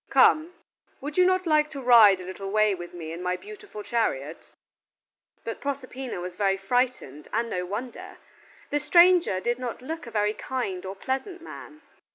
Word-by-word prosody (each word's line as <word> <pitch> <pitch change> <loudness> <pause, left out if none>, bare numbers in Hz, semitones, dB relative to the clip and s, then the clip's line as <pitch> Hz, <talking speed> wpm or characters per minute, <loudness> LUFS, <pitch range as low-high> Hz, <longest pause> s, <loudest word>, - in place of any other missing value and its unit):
"Come! 325 +3 +4 0.4
would 290 +2 -6
you 365 - +5
not 370 0 +1
like 305 -2 +3
to 290 -3 -7
ride 230 -7 +7
a 180 - -8
little 195 +1 -6
way 215 0 +3
with 175 -2 -7
me 165 -2 -7
in 170 +2 -6
my 180 0 -1
beautiful 410 - -10
chariot?" 160 - -2 0.9
But - - -6
Proserpina 265 -5 -5
was 180 0 -6
very 195 -1 +1
frightened, 195 - -1
and 230 +1 -1
no 180 0 -2
wonder. 230 +6 -6 0.5
The 290 - +1
stranger 345 - +5
did 240 +5 -1
not 250 0 -5
look 320 0 -6
a - - -6
very 210 -2 0
kind 195 -8 -4
or 190 - -6
pleasant 270 - -4
man. 305 -2 -11
235 Hz, 175 wpm, -26 LUFS, 190-295 Hz, 0.9 s, ride